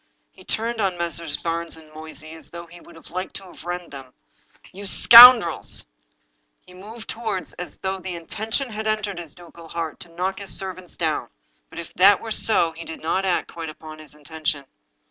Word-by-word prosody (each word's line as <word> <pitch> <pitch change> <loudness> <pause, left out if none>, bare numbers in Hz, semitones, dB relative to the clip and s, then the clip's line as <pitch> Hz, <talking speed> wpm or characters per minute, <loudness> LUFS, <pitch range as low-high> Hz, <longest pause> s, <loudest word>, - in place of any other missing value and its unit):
He - - -17
turned 230 +1 -2
on 190 -3 0
Messrs. 170 -2 -2
Barnes 165 0 -3
and 155 -1 -16
Moysey 155 0 -10
as 160 0 -11
though 170 0 -9
he 175 +1 -15
would 170 - -16
have 165 - -15
liked 185 +2 -5
to 190 -2 -9
rend 175 0 -5
them. 135 -2 -11 0.3
" - - -25
You 200 +2 -8
scoundrels! 235 -4 +8 0.4
" - - -46
He 180 - -16
moved 220 +5 -9
forward 220 -5 -4
as 180 - -5
though 190 0 -3
the 185 -1 -6
intention 220 - -4
had 220 0 -4
entered 210 -4 -2
his 165 -4 -8
ducal 170 -1 -14
heart 165 -3 -5
to 175 - -9
knock 185 +3 -3
his 200 -2 -1
servants 185 -2 -7
down. 160 -3 -1 0.4
But, - - -14
if 170 - -9
that 195 +2 +6
were 225 - -7
so, 215 -6 +2
he 165 +1 -10
did 160 - -9
not 185 +4 0
act 180 -2 -1
quite 165 -2 -6
up 155 - -11
to 155 -1 -10
his 150 -2 -12
intention. 150 -1 -4
175 Hz, 205 wpm, -23 LUFS, 160-195 Hz, 0.4 s, scoundrels